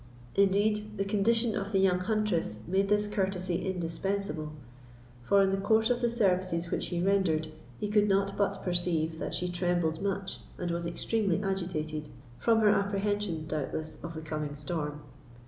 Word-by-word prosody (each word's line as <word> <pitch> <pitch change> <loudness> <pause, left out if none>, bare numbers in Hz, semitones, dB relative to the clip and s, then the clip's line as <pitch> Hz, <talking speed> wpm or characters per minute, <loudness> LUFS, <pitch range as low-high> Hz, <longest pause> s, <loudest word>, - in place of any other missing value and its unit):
Indeed, 210 +2 +2
the 195 - 0
condition 225 +3 +2
of 200 +1 -3
the 195 - +2
young 190 -2 +4
huntress 210 - 0
made 195 +2 +1
this 210 0 +3
courtesy 190 -3 -1
indispensable; 175 -2 -2 0.7
for, 195 +11 +4
in 190 - +2
the 195 - 0
course 220 +3 +3
of 245 0 +1
the 240 - +2
services 185 -6 +1
which - - -1
he 175 - -2
rendered, 175 -4 +2 0.3
he - - -1
could 210 0 +3
not 195 0 +2
but 200 -1 0
perceive 170 -3 0
that - - -3
she 180 - -1
trembled 175 -2 0
much, 195 -1 -2 0.2
and 175 -1 -2
was 170 0 -2
extremely 200 +1 0
agitated, 155 -6 -2 0.3
from 225 -1 +3
her 210 - +6
apprehensions, 200 -4 0
doubtless, 155 +1 -4
of 165 -1 -6
the 160 - -5
coming 150 -2 -4
storm. 150 0 -3
190 Hz, 165 wpm, -30 LUFS, 165-205 Hz, 0.7 s, her